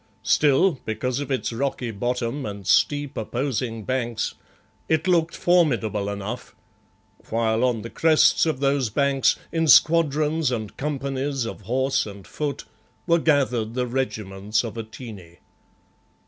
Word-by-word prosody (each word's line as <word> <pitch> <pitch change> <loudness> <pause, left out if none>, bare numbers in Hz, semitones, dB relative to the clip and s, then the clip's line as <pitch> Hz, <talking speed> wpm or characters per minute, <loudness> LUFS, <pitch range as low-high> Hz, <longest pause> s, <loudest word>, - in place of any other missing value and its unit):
Still, 150 +2 +3
because 120 +4 -2
of 145 - -5
its 130 -3 -1
rocky 125 -1 -2
bottom 120 +5 -2
and 100 -3 -6
steep, 145 +7 +2
opposing 120 -1 -3
banks, 120 -2 -2 0.6
it 160 +2 +1
looked 170 -2 +2
formidable 120 - +2
enough, 100 +4 -6 0.7
while 115 +1 +1
on 120 -4 +1
the 115 - -6
crests 160 0 +4
of 150 -4 -1
those 135 -3 +1
banks, 140 +3 +2 0.2
in 165 -1 0
squadrons 155 -1 +4
and 110 -4 -4
companies 140 -2 -2
of 115 - -6
horse 130 +4 0
and 100 -2 -10
foot, 145 -2 -4 0.4
were 170 0 +3
gathered 125 -8 +1
the 125 -1 0
regiments 110 -5 -2
of 115 -2 -6
Atene. 110 -6 -9
130 Hz, 130 wpm, -24 LUFS, 110-145 Hz, 0.7 s, crests